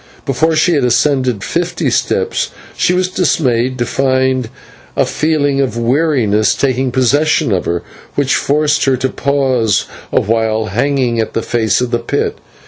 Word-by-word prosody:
Before 155 Hz, +5 st, +1 dB
she 165 Hz, +3 st, +3 dB
had 145 Hz, -, +1 dB
ascended 125 Hz, -2 st, +1 dB
fifty -, -, -1 dB
steps -, -, 0 dB, 0.3 s
she -, -, +1 dB
was 185 Hz, 0 st, +1 dB
dismayed 130 Hz, -9 st, 0 dB
to 120 Hz, -, 0 dB
find 130 Hz, -2 st, 0 dB, 0.5 s
a -, -, +2 dB
feeling 145 Hz, -3 st, 0 dB
of 130 Hz, -3 st, -2 dB
weariness 120 Hz, -4 st, +1 dB
taking 130 Hz, -1 st, 0 dB
possession 135 Hz, +1 st, +2 dB
of 95 Hz, -2 st, 0 dB
her, 85 Hz, 0 st, -2 dB, 0.3 s
which 140 Hz, -2 st, +1 dB
forced 150 Hz, +1 st, +1 dB
her 135 Hz, -2 st, +2 dB
to 130 Hz, +1 st, -1 dB
pause 130 Hz, -7 st, 0 dB, 0.3 s
awhile 110 Hz, 0 st, 0 dB
hanging 130 Hz, 0 st, 0 dB
to 110 Hz, -1 st, 0 dB
the 115 Hz, -, -2 dB
face 110 Hz, -2 st, +1 dB
of 125 Hz, -1 st, -2 dB
the 120 Hz, -, +1 dB
pit. 115 Hz, -, -2 dB
130 Hz, 150 wpm, -15 LUFS, 115-145 Hz, 0.5 s, she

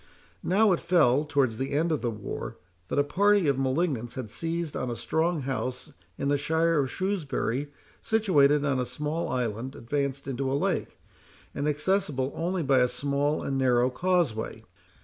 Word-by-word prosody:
Now, 205 Hz, +3 st, +3 dB
it 175 Hz, -, +2 dB
fell, 150 Hz, -5 st, +3 dB
towards 135 Hz, -7 st, +1 dB
the 135 Hz, +1 st, -2 dB
end 160 Hz, +4 st, +1 dB
of 155 Hz, -, 0 dB
the 120 Hz, -, 0 dB
war, 105 Hz, -3 st, -6 dB, 0.3 s
that -, -, -3 dB
a 145 Hz, -, +5 dB
party 200 Hz, +4 st, +3 dB
of 140 Hz, -2 st, +2 dB
malignants 135 Hz, -3 st, -1 dB
had 125 Hz, -5 st, -6 dB
seized 165 Hz, +2 st, -3 dB
on 125 Hz, -, -2 dB
a 120 Hz, -, -3 dB
strong 160 Hz, +5 st, 0 dB
house 125 Hz, -1 st, -4 dB, 0.3 s
in -, -, -2 dB
the 145 Hz, 0 st, +2 dB
shire 160 Hz, +2 st, +2 dB
of 135 Hz, -2 st, 0 dB
Shrewsbury, 145 Hz, -, -2 dB, 0.3 s
situated 150 Hz, -10 st, +3 dB
on 135 Hz, -3 st, +1 dB
a 125 Hz, -, 0 dB
small 150 Hz, +3 st, -3 dB
island 125 Hz, +1 st, -2 dB
advanced 140 Hz, +2 st, -3 dB
into 135 Hz, 0 st, -2 dB
a 140 Hz, -, +1 dB
lake, -, -, -1 dB, 0.6 s
and 145 Hz, -, -2 dB
accessible 150 Hz, -3 st, 0 dB
only 175 Hz, +1 st, -1 dB
by 135 Hz, -2 st, +4 dB
a 125 Hz, -, +4 dB
small 140 Hz, +3 st, -1 dB
and 135 Hz, -1 st, -1 dB
narrow 125 Hz, -1 st, +3 dB
causeway. 170 Hz, -7 st, 0 dB
145 Hz, 170 wpm, -27 LUFS, 130-165 Hz, 0.6 s, a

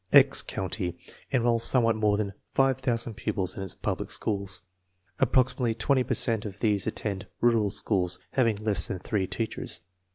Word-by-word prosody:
1 -, -, +9 dB
"X" -, -, +4 dB
County 90 Hz, -2 st, -4 dB, 0.3 s
enrolls 120 Hz, -3 st, +2 dB
somewhat 115 Hz, -2 st, +4 dB
more 105 Hz, -1 st, +2 dB
than 100 Hz, -2 st, -2 dB, 0.2 s
five 135 Hz, -1 st, +2 dB
thousand 120 Hz, -2 st, -1 dB
pupils 100 Hz, -3 st, -2 dB
in -, -, -6 dB
its 95 Hz, -2 st, -5 dB
public -, -, -3 dB
schools. 100 Hz, -4 st, -1 dB, 0.6 s
Approximately 125 Hz, -2 st, +2 dB
twenty 130 Hz, +4 st, +2 dB
per 125 Hz, -, -1 dB
cent 115 Hz, -4 st, +2 dB
of 100 Hz, -2 st, -7 dB
these 105 Hz, -4 st, +1 dB
attend 100 Hz, -3 st, -3 dB
rural 115 Hz, -4 st, +3 dB
schools 95 Hz, -3 st, 0 dB
having 115 Hz, -5 st, +2 dB
less 100 Hz, -4 st, +3 dB
than 95 Hz, -, -3 dB
three 95 Hz, 0 st, -2 dB
teachers. 110 Hz, -1 st, -3 dB
110 Hz, 165 wpm, -27 LUFS, 100-120 Hz, 0.6 s, 1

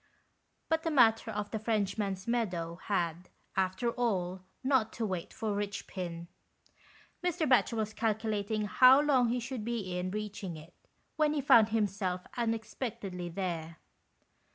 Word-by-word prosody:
But 320 Hz, 0 st, +1 dB
the 325 Hz, -, -1 dB
matter 230 Hz, -6 st, +4 dB
of 210 Hz, -1 st, -4 dB
the 220 Hz, -, -2 dB
Frenchman's 205 Hz, -3 st, -1 dB
Meadow 180 Hz, -8 st, -1 dB
had, 175 Hz, -3 st, -1 dB, 0.3 s
after 190 Hz, +5 st, 0 dB
all, 190 Hz, -7 st, -1 dB, 0.2 s
not 260 Hz, -5 st, +2 dB
to 230 Hz, -, -2 dB
wait 185 Hz, -4 st, -3 dB
for 220 Hz, -4 st, -2 dB
Eichpin. 185 Hz, -4 st, -4 dB, 1.0 s
Mr. 350 Hz, -3 st, 0 dB
Batchel 250 Hz, -2 st, +4 dB
was 215 Hz, -1 st, -2 dB
calculating 215 Hz, -1 st, -1 dB
how 255 Hz, +5 st, +7 dB
long 270 Hz, -5 st, +3 dB
he 245 Hz, +1 st, 0 dB
should 245 Hz, -1 st, -5 dB
be 215 Hz, -6 st, -3 dB
in 180 Hz, +1 st, -2 dB
reaching 205 Hz, -4 st, -5 dB
it, 155 Hz, +3 st, -13 dB, 0.4 s
when 305 Hz, -1 st, +3 dB
he 300 Hz, -, 0 dB
found 225 Hz, -5 st, +6 dB
himself 200 Hz, -4 st, 0 dB
unexpectedly 225 Hz, -5 st, -3 dB
there. 165 Hz, -2 st, -4 dB
210 Hz, 135 wpm, -31 LUFS, 185-235 Hz, 1.0 s, how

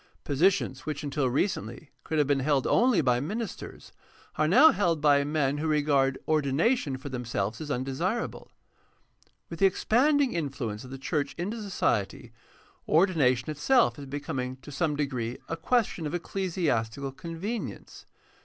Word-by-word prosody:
Positions 150 Hz, -2 st, +1 dB
which 150 Hz, -1 st, -3 dB
until 140 Hz, -2 st, 0 dB
recently 125 Hz, -, -2 dB
could 160 Hz, -, -3 dB
have 150 Hz, -, +4 dB
been 140 Hz, 0 st, +1 dB
held 135 Hz, -1 st, +1 dB
only 245 Hz, -4 st, +3 dB
by 125 Hz, -1 st, +2 dB
ministers 210 Hz, -, -6 dB, 0.4 s
are 155 Hz, -, +2 dB
now 270 Hz, -, +7 dB
held 170 Hz, -6 st, +1 dB
by 145 Hz, -1 st, +4 dB
men 145 Hz, -1 st, 0 dB
who 160 Hz, -, -1 dB
regard 145 Hz, -3 st, +2 dB
ordination 155 Hz, -, +1 dB
for 135 Hz, +2 st, -8 dB
themselves 115 Hz, -3 st, -3 dB
as 155 Hz, -, -6 dB
undesirable. 140 Hz, -, -3 dB, 1.0 s
With 165 Hz, -, -8 dB
the 195 Hz, -, +6 dB
expanding 265 Hz, +7 st, +2 dB
influence 130 Hz, -9 st, -3 dB
of 130 Hz, -, -11 dB
the 135 Hz, -, -7 dB
church 140 Hz, +2 st, -2 dB
into 205 Hz, +6 st, -3 dB
society, 120 Hz, -, -1 dB, 0.6 s
ordination 155 Hz, -7 st, +3 dB
itself 230 Hz, -, +2 dB
is 140 Hz, -, -8 dB
becoming 130 Hz, -2 st, -4 dB
to 145 Hz, -, -10 dB
some 150 Hz, +1 st, 0 dB
degree 130 Hz, -5 st, -2 dB
a 165 Hz, -, -3 dB
question 180 Hz, -2 st, 0 dB
of 155 Hz, -, -3 dB
ecclesiastical 145 Hz, -, -2 dB
convenience. 170 Hz, -, -6 dB
150 Hz, 145 wpm, -28 LUFS, 135-180 Hz, 1.0 s, now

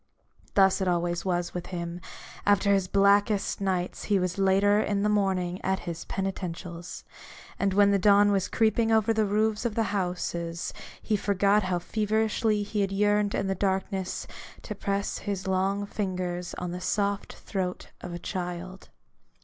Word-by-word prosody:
Thus 195 Hz, -1 st, +4 dB
it 190 Hz, -, 0 dB
was 175 Hz, 0 st, 0 dB
always 175 Hz, -1 st, -1 dB
with 180 Hz, -1 st, -5 dB
him: 170 Hz, -1 st, -5 dB, 0.4 s
after 200 Hz, 0 st, +3 dB
his 195 Hz, -2 st, +1 dB
blackest 200 Hz, +1 st, +3 dB
nights 185 Hz, -2 st, -1 dB
he 205 Hz, -, +2 dB
was 180 Hz, 0 st, -1 dB
ever 195 Hz, +2 st, +4 dB
in 205 Hz, -1 st, 0 dB
the 210 Hz, -, +2 dB
morning 190 Hz, -3 st, 0 dB
at 190 Hz, 0 st, 0 dB
his 170 Hz, -1 st, -6 dB
penitentials: 175 Hz, -3 st, -5 dB, 0.6 s
and 200 Hz, -1 st, +2 dB
when 200 Hz, 0 st, +5 dB
the 200 Hz, -, +3 dB
dawn 205 Hz, +1 st, +5 dB
was 195 Hz, -2 st, +1 dB
creeping 225 Hz, 0 st, +2 dB
over 220 Hz, 0 st, +3 dB
the 220 Hz, -1 st, +1 dB
roofs 215 Hz, +1 st, +1 dB
of 235 Hz, -3 st, -2 dB
the 225 Hz, -2 st, 0 dB
houses, 175 Hz, -3 st, -2 dB, 0.3 s
he 215 Hz, -, +1 dB
forgot 200 Hz, +1 st, +2 dB
how 185 Hz, -2 st, 0 dB
feverishly 215 Hz, +2 st, 0 dB
he 205 Hz, 0 st, -2 dB
had 195 Hz, -1 st, 0 dB
yearned 205 Hz, +1 st, +2 dB
in 200 Hz, -, 0 dB
the 195 Hz, -, 0 dB
darkness 190 Hz, 0 st, -2 dB, 0.4 s
to 210 Hz, -, -5 dB
press 200 Hz, 0 st, -2 dB
his 195 Hz, -2 st, -4 dB
long 195 Hz, +2 st, 0 dB
fingers 180 Hz, -3 st, -3 dB
on 180 Hz, -, -4 dB
the 180 Hz, +1 st, -5 dB
soft 200 Hz, +2 st, -1 dB
throat 185 Hz, -3 st, -4 dB
of 180 Hz, -, -6 dB
a 175 Hz, -, -4 dB
child. 180 Hz, +1 st, -5 dB
195 Hz, 165 wpm, -27 LUFS, 180-205 Hz, 0.6 s, when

